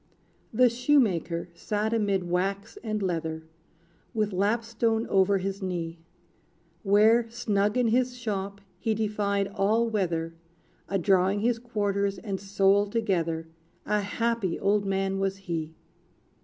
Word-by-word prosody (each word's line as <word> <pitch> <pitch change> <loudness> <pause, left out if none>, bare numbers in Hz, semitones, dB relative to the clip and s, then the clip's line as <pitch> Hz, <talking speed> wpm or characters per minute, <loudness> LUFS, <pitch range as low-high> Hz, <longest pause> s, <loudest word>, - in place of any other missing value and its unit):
The 250 +3 +5
shoemaker 225 - +1
sat 210 +5 -2
amid 200 -4 +1
wax 195 +3 -1
and 215 -2 -2
leather, 160 -3 -2 0.7
With 210 -2 0
lapstone 225 +3 0
over 195 +1 +4
his 195 +1 -4
knee; 170 -3 -3 0.8
Where, 220 +4 +4
snug 210 -2 0
in 245 -2 +3
his 250 +2 +1
shop, 200 -4 -4 0.2
he 220 -1 0
defied 205 -2 0
all 215 +4 +1
weather, 170 -7 -1 0.6
A 195 - +1
drawing 190 +1 +2
his 235 +1 +1
quarters 200 -4 -1
and 190 +1 -4
sole 200 +1 +3
together: 170 -7 -1 0.4
A 210 0 +1
happy 230 -2 -1
old 200 +1 +2
man 195 0 0
was 195 0 -1
he! 165 -4 -4
200 Hz, 125 wpm, -27 LUFS, 190-220 Hz, 0.8 s, The